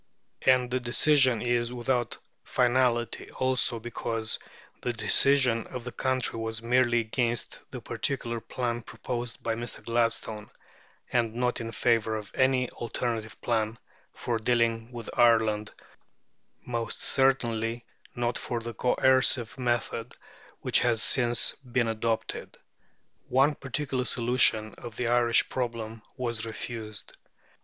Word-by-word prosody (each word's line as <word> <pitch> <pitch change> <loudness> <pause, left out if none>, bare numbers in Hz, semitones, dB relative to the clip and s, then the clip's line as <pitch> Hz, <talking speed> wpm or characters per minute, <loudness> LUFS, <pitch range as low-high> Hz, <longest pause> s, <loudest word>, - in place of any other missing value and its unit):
And 125 -1 +3
the 130 - +1
decision 130 0 +3
is 120 -1 +1
without 120 0 -1 0.3
finality, 120 -1 +1
also, 130 -2 +1
because 115 -1 -3 0.4
the 120 - -1
decision 120 +2 +3
of 125 -2 -7
the 125 - -6
country 130 -3 0
was 115 0 -3
merely 120 0 +3
against 115 +1 -1
the - - -7
particular 120 -4 -2
plan 120 +1 -3
proposed 120 0 -5
by 115 - 0
Mr. 120 +1 -6
Gladstone, 115 -2 -1 0.6
and 115 -2 +1
not 125 0 0
in 115 0 -5
favour 115 -2 +1
of 105 -1 -6
any 130 -1 +2
alternative 115 -2 -4
plan 110 -1 0 0.3
for 120 -2 -2
dealing 115 0 +1
with 120 -2 -8
Ireland, 110 -3 +3 0.9
most 115 -2 -3
certainly 120 -3 +1 0.3
not 120 0 -1
for 120 - -3
the 115 0 -6
coercive 125 -1 +3
method 120 -1 -2 0.4
which - - +3
has 120 -2 +2
since 120 -2 +3
been 125 -3 -1
adopted. 115 0 -2 0.7
One 135 +4 +4
particular 135 -2 -2
solution 115 -3 +3
of 120 -2 -8
the 120 0 -1
Irish 120 -1 +4
problem 115 -3 -4 0.2
was 120 -4 -2
refused. 110 -2 -6
120 Hz, 120 wpm, -28 LUFS, 115-125 Hz, 0.9 s, One